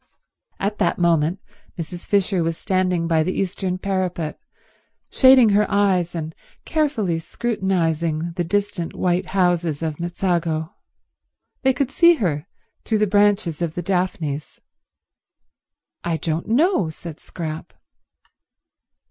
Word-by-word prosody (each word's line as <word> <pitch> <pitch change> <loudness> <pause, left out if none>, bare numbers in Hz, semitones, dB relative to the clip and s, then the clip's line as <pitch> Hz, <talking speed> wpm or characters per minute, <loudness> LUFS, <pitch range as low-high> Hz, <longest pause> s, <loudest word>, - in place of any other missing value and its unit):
At 205 +2 -2
that 180 - +1
moment 170 +1 +2 0.4
Mrs. 175 +1 -6
Fisher 195 -2 +2
was 165 0 -1
standing 185 -3 0
by 165 -1 +3
the 180 +4 -1
eastern 185 -1 -1
parapet, 185 -4 -2 0.7
shading 260 -4 +7
her 205 +1 +3
eyes 190 -4 +2
and 160 -1 -4 0.3
carefully 270 - 0
scrutinizing 170 -6 -1
the 175 +1 -2
distant 195 -1 -2
white 180 +1 0
houses 175 -5 +1
of 155 -2 -3
Mezzago. 170 -2 -1 0.9
They 265 -1 +3
could 265 +1 -1
see 340 +3 +6
her 170 - -2 0.4
through 220 - 0
the 210 - +3
branches 205 -5 +2
of 165 -2 -2
the 175 - -3
daphnes. 170 -5 -2 1.4
"I 170 -1 -1
don't 160 +1 -2
know," 255 - +2
said 160 0 -9
Scrap. 160 -2 -6
180 Hz, 120 wpm, -22 LUFS, 165-200 Hz, 1.4 s, shading